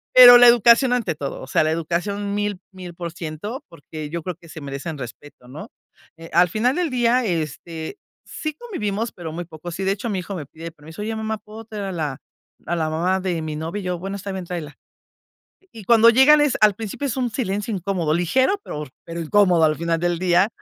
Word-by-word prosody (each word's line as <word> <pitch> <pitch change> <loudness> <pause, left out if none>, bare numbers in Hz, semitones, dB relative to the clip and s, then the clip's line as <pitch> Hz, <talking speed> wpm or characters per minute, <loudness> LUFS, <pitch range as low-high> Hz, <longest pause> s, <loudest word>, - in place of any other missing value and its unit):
Pero 245 -1 +11
la 245 0 +8
educación 235 +2 +6
ante 245 -9 0
todo, 140 -2 -5
o 130 - -9
sea, 135 - +2
la 155 - +1
educación 175 +5 -2
1000, 205 -2 -2
1000%, 175 - -7
porque 155 -1 -8
yo 170 +1 -5
creo 180 0 -4
que 170 0 -18
se 160 - -9
merecen 140 +3 -5
respeto, 125 0 -10
¿no? 140 +5 -9 0.5
Eh, 165 0 -11
al 175 +1 +5
final 235 +8 +1
del 355 -2 0
día, 250 0 +2
este, 165 - -4 0.3
sí 310 -1 -5
convivimos, 230 - -3
pero 170 -3 -7
muy 175 +2 -5
poco. 165 +1 -9
Sí, 185 +3 -4
de 190 - +1
hecho, 205 +4 -3
mi 195 -3 -1
hijo 195 +2 -6
me 155 -5 -6
pide 165 +3 -9
permiso: 160 +4 -11
"Oye, 220 +1 -3
mamá, 220 0 -3
¿puedo 215 +1 -11
traer 215 -2 -6
a 195 - -4
la 150 -6 -3 0.5
a 175 - -1
la 160 -2 -1
mamá 175 +4 0
de 180 -3 -2
mi 155 -1 -4
novia?", 165 +6 -4
y - - -9
yo: 180 -1 -3
"Bueno, 195 +3 -5
está 200 0 -6
bien, 190 -1 -5
tráela". 165 -5 -6 1.0
Y 220 -3 -11
cuando 230 +1 +6
llegan 265 +6 +6
es 295 -4 +2
al 210 -1 +5
principio 225 +6 -5
es 255 - -3
un 250 -2 -1
silencio 210 -2 -2
incómodo, 180 -4 -1
ligero, 260 - +2
pero, 150 0 -5 0.2
pero 170 0 -6
incómodo 175 0 +3
al 155 -1 +3
final 165 0 -1
del 175 -1 0
día. 180 +2 +3
180 Hz, 215 wpm, -22 LUFS, 165-220 Hz, 1.0 s, Pero